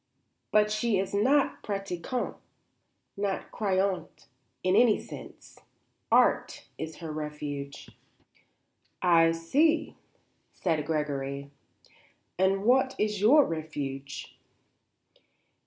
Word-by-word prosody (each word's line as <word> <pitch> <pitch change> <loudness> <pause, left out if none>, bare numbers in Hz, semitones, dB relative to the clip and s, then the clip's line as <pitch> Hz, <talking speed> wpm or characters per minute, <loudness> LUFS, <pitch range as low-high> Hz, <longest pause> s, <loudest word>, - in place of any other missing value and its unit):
But 210 0 +3
she 215 0 +1
is 190 +1 -2
not 265 +8 +2
pratiquante; 195 +3 -4 0.8
not 200 -1 -3
croyante 195 -3 -1 0.4
in 185 +1 +3
any 235 -4 +5
sense. - - -11 0.5
Art - - +3
is 160 0 -5
her 165 -2 -7
refuge." 150 -2 -6 1.2
"I 165 -2 +5
see," 295 - +1 0.6
said 160 -4 -1
Gregory. 140 -3 -2 0.9
"And 195 +1 +2
what 260 +3 +3
is 210 -2 -1
your 280 +8 +6
refuge?" 140 -4 -5
185 Hz, 90 wpm, -28 LUFS, 155-210 Hz, 1.2 s, your